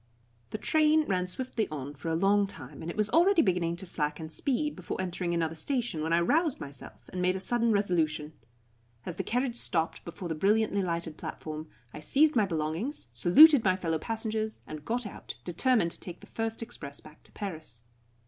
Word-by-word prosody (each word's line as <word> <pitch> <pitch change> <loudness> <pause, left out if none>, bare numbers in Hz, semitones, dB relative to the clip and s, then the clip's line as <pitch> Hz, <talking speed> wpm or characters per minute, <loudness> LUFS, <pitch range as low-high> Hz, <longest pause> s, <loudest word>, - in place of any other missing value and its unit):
The - - -4
train 310 +5 +3
ran 185 -2 0
swiftly 225 +1 -3
on 145 -1 -5
for 145 +3 -6
a 160 - +1
long 200 +3 +3
time, 140 -6 -9
and 160 - -5
it - - -6
was 215 0 +1
already 345 +4 +5
beginning 175 -3 +1
to 185 +3 -5
slacken 155 -2 0
speed 285 - -1
before 185 - -5
entering 180 -1 -2
another 165 -1 0
station 240 - -1
when 160 +1 -2
I 170 - +4
roused 305 - +2
myself, 125 -5 -10
and 180 - -4
made 180 +1 +2
a - - -2
sudden 235 +3 +2
resolution. 160 -7 0 0.7
As 175 - -5
the - - -1
carriage 245 0 -1
stopped 165 -7 0
before 175 +2 -7
the 165 - -2
brilliantly 205 +4 +2
lighted 170 -3 -3
platform, 155 0 -6 0.3
I - - -7
seized 280 - +3
my 215 -4 +3
belongings, 160 - -3
saluted 260 - +7
my 185 -2 +3
fellow 165 -4 -1
passengers, 220 +1 -2
and 155 -1 -8
got 240 +1 -1
out, 205 - -8
determined 180 +1 +2
to - - -6
take 175 -1 -8
the - - -12
first 225 0 -3
express 150 -12 -5
back 155 0 -16
to - - -16
Paris. 160 - -3
185 Hz, 195 wpm, -29 LUFS, 160-225 Hz, 0.7 s, saluted